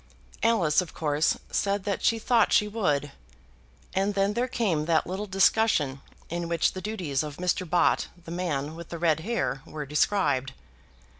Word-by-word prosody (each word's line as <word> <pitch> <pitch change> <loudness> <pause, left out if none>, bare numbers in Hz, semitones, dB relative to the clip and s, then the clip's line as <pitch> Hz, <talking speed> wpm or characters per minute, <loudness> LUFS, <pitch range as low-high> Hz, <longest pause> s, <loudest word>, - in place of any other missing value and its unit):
Alice 185 -9 +3
of 180 - -9
course 150 0 +1
said 200 0 0
that 200 -1 -2
she 230 - +3
thought 235 +1 +2
she 210 - +4
would; 150 -10 0 0.8
and 195 +2 0
then 200 +1 +2
there 245 +3 0
came 185 -12 0
that 165 -1 +2
little 195 +4 -4
discussion 190 -8 +2 0.3
in 170 0 -3
which 170 0 +1
the 185 - -6
duties 185 -11 -2
of 150 -2 -6
Mr. 180 0 -1
Bott, 175 +1 +3 0.2
the 165 - -8
man 155 -5 -2
with 170 0 -9
the 170 - -5
red 160 -2 +2
hair, 205 -8 -2
were 150 -1 -7
described. 140 -3 +1
175 Hz, 165 wpm, -27 LUFS, 150-205 Hz, 0.8 s, she